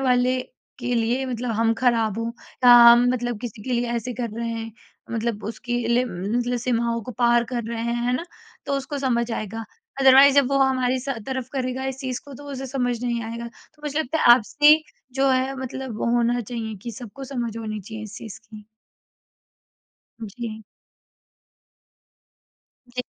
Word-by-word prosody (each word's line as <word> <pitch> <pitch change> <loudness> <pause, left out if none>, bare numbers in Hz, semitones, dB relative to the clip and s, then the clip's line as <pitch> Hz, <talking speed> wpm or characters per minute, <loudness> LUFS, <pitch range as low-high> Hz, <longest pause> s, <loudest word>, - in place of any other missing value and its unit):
वाले 255 -1 +2 0.4
के 245 0 -2
लिए 240 +3 +1
मतलब 245 -1 -3
हम 230 0 +3
ख़राब 230 -4 +2
हो 230 - -2 0.4
या 245 - +10 0.2
हम 240 +1 +6
मतलब 240 -2 -2
किसी 225 -3 -7
के 255 - -3
लिए 240 0 +1
ऐसे 245 +2 -3
कर 235 - -2
रहे 235 0 -2
हैं। 225 -1 -5 0.4
मतलब 230 -2 -2
उसकी 230 +3 -5 0.2
लि 245 +2 +3
मतलब 240 +5 -2
सीमाओं 235 -1 0
को 250 - -7
पार 240 -1 +4
कर 240 -1 -3
रहे 230 -1 -3
हैं, 235 0 -1
है 250 - +1
ना। 335 - -5 0.4
तो 280 - -2
उसको 275 +1 -4
समझ 240 -3 0
आएगा, 225 +1 -4 0.4
अदरवाइज़ 270 +1 +8
जब 280 -2 +5
वो 275 - +2
हमारी 260 -1 +2
सा 275 +2 -3
तरफ़ 260 -1 -3
करेगा 260 -1 -2
इस 265 0 -3
चीज़ 255 -2 -3
को 280 -1 -11
तो 290 - -11
उसे 270 0 -5
समझ 245 -2 -2
नहीं 235 -1 -1
आएगा। 230 +1 -5
तो 300 +5 -23
मुझे 295 +1 -2
लगता 315 +1 -1
है - - +1
आपसी 295 +6 +4 0.3
जो 270 +1 +2
है 260 +1 +1
मतलब 260 -2 -5
वो - - -1
होना 240 +1 +2
चाहिए 225 -1 -5
कि 235 - -5
सबको 245 +4 -9
समझ 240 -4 -4
होनी 215 -2 -4
चाहिए 215 +2 -8
इस 215 - -9
चीज़ 220 -3 -9
की। 215 -1 -11 1.6
उ, 220 - -5
जी। 220 -3 -6 2.3
जी। 250 +1 -4
245 Hz, 180 wpm, -23 LUFS, 230-260 Hz, 2.3 s, या